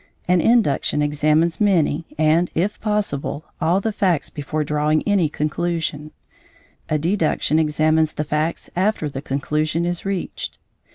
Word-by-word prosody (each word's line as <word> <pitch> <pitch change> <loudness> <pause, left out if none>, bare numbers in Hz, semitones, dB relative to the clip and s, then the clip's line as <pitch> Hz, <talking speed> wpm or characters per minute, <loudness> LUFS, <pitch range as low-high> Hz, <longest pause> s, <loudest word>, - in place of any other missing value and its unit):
An 180 -1 +3
induction 205 -9 +2
examines 155 +4 +1
many, 170 -6 +2
and, 160 +3 +3
if 190 +6 0
possible, 205 -9 -1 0.2
all 175 +4 +3
the 220 +3 -1
facts 185 -7 0
before 150 +1 -3
drawing 150 +1 +1
any 195 -7 +3
conclusion; 155 0 -2 0.8
a 155 - +2
deduction 160 -2 +1
examines 155 0 +2
the 150 - -2
facts 155 +2 -2
after 185 -5 0
the 135 - -5
conclusion 150 +4 -1
is 175 0 -2
reached. 195 -2 -4
160 Hz, 130 wpm, -21 LUFS, 150-180 Hz, 0.8 s, An